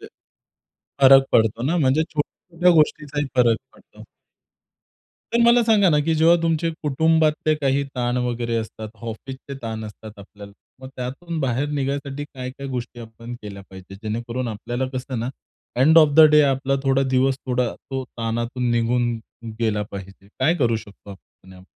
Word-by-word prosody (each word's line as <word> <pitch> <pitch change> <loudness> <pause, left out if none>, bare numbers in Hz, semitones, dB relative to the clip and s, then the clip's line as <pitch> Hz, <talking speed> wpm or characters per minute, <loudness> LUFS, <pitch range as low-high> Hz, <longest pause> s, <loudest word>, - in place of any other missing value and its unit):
ते. - - -11 1.0
फरक 135 0 +8
पडतो 115 +1 +2
ना? 160 +7 0
म्हणजे 140 +2 +3
छोट्या-छोट्या 170 +3 -1
गोष्टींचाही 150 -1 0
फरक 120 -2 +4 0.2
पडतो. - - -18 1.3
तर 235 - +2
मला 235 0 +5
सांगा 210 -4 +4
ना 150 - +3
की 165 +1 +1
जेव्हा 160 +2 +5
तुमचे 165 0 +1
कुटुंबातले 155 +1 +2
काही 140 -2 0
ताण 120 0 -1
वगैरे 120 -1 -2
असतात, 110 -1 -5
ऑफिसचे 130 +4 -7
ताण 110 -1 -5
असतात 105 0 -11
आपल्याला. 100 0 -12 0.3
मग 130 - -9
त्यातून 140 +7 -5
बाहेर 135 +2 -1
निघायसाठी 140 0 -3
काय-काय 130 0 -8
गोष्टी 120 -2 -5
आपण 115 +1 -9
केल्या 100 -1 -8
पाहिजेत. 95 +1 -11
जेणेकरून 115 +3 -3
आपल्याला 120 +4 -4
कसं 130 -1 -4
ना, 120 - -3 0.5
एंड 155 +6 +6
ऑफ 155 - +7
द 160 - +8
डे 150 0 +6
आपला 135 +1 -1
थोडा 135 0 +2
दिवस 130 +1 +2
थोडा 125 -1 0
तो 135 -1 -6
ताणातून 120 +1 -3
निघून 120 +1 +1 0.5
गेला 105 -2 0
पाहिजे? 100 0 -10
काय 150 +6 +3
करू 115 -6 +1
शकतो 105 -2 -12
आपण? 95 -1 -16
130 Hz, 150 wpm, -22 LUFS, 115-145 Hz, 1.3 s, फरक